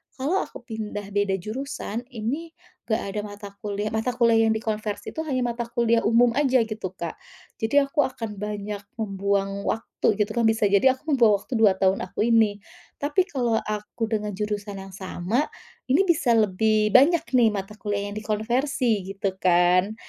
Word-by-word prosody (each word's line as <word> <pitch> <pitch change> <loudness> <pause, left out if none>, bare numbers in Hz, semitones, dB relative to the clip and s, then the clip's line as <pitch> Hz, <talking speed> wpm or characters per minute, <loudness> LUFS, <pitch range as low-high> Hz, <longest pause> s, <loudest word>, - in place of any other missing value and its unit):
kalau 290 +9 0
aku - - -12
pindah 215 -4 -5
beda 200 -1 +1
jurusan, 235 +1 -5
ini 280 +9 -4 0.3
enggak 220 - 0
ada 210 - -2
mata 205 0 -9
kuliah 205 0 -2
mata 220 +3 0
kuliah 230 -2 +4
yang - - +3
dikonversi 215 -1 -3
itu 320 - -2
hanya 260 -3 0
mata 235 0 -2
kuliah 235 -1 +2
umum 235 +1 +5
saja 260 -4 +3
gitu, 215 -3 -4
Kak. 170 -3 -5 0.5
Jadi 260 +6 +4
aku 275 +2 +1
akan 230 -5 -5
banyak 210 0 -5 0.2
membuang 200 -1 -1
waktu 225 - -2
gitu 210 +1 +1
kan, 235 0 +1
bisa 220 -1 +2
jadi 255 +6 +5
aku 300 +4 -6
membuang 225 -5 +5
waktu 260 - -8
2 210 -3 +6
tahun 190 0 +2
aku 195 +4 -1
ini. 215 -3 +3 0.4
Tapi 295 +6 +2
kalau 240 -5 0
aku 210 +2 -5
dengan 210 -1 -1
jurusan 205 0 -3
yang 195 - -10
sama, 195 - -1 0.4
ini 300 +9 +4
bisa 320 -7 +3
lebih 215 +1 +2
banyak 320 +5 +6
nih 240 -3 +5
mata 195 0 -5
kuliah 205 -1 -2
yang 205 - -7
dikonversi 225 +1 0
gitu 195 -1 -2
kan. 180 +3 +3
220 Hz, 170 wpm, -25 LUFS, 205-245 Hz, 0.5 s, 2